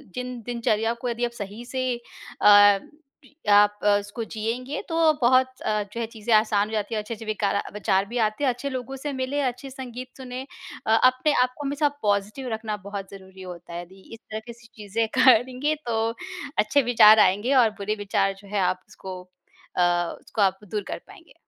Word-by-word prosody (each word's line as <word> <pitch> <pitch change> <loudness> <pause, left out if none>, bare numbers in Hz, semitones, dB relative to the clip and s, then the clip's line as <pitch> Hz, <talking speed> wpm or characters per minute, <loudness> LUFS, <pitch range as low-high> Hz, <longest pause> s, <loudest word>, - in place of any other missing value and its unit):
जिन 250 -1 -5
दिनचर्या 230 -2 0
को 250 - -2
यदि 240 +1 -1
आप 240 - -4
सही 210 +1 -7
से 260 +1 -3 0.6
अ, 205 -1 +7 0.7
आप 205 0 +5
अ, 205 -1 +5
उसको 205 +3 -6
जियेंगे 235 +6 -4
तो 325 -1 +4
बहुत 255 +1 +3
अ, 210 -1 0
जो 235 - -5
है 230 - -1
चीज़ें 225 0 -2
आसान 215 -1 +3
हो - - -9
जाती 215 +1 -2
है 215 - 0
अच्छे-अच्छे 225 +1 -7
विकार 210 -2 -1
अ, 200 - -2
विचार 195 -1 +1
भी 240 +4 -5
आते 215 +7 -3
हैं 265 - +4
अच्छे 250 +3 -3
लोगों 260 0 -5
से 290 -2 -3
मिले 260 +2 -2
अच्छे 255 +1 -3
संगीत 255 -1 -8
सुने। 255 -1 -6 0.5
अ, - - 0
अपने 255 +4 +4
आप 250 0 -2
को 290 - -6
हमेशा 290 +1 +1
पॉज़िटिव 210 +5 -1
रखना 220 -1 -3
बहुत 200 -1 -6
ज़रूरी 190 -1 -12
होता 175 -2 -9
है 175 - -4
यदि 190 +2 -15
इस 225 - -10
तरह 220 +2 -6
से 235 0 -16
चीज़ें 220 +1 -2
करेंगे 255 +4 +4
तो 225 -2 0 0.6
अच्छे 215 +7 +3
विचार 215 -1 +8
आएँगे 205 +8 +3
और 225 - +3
बुरे 210 +2 -1
विचार 195 -1 +1
जो 200 - -15
है - - +2
आप 185 0 -3
उसको 190 -2 -9 0.6
अ, - - +3 0.4
उसको 215 - -4
आप 190 -1 +2
दूर 210 -2 -1
कर - - -4
पाएँगे। 395 -4 -16
225 Hz, 195 wpm, -25 LUFS, 205-255 Hz, 0.7 s, विचार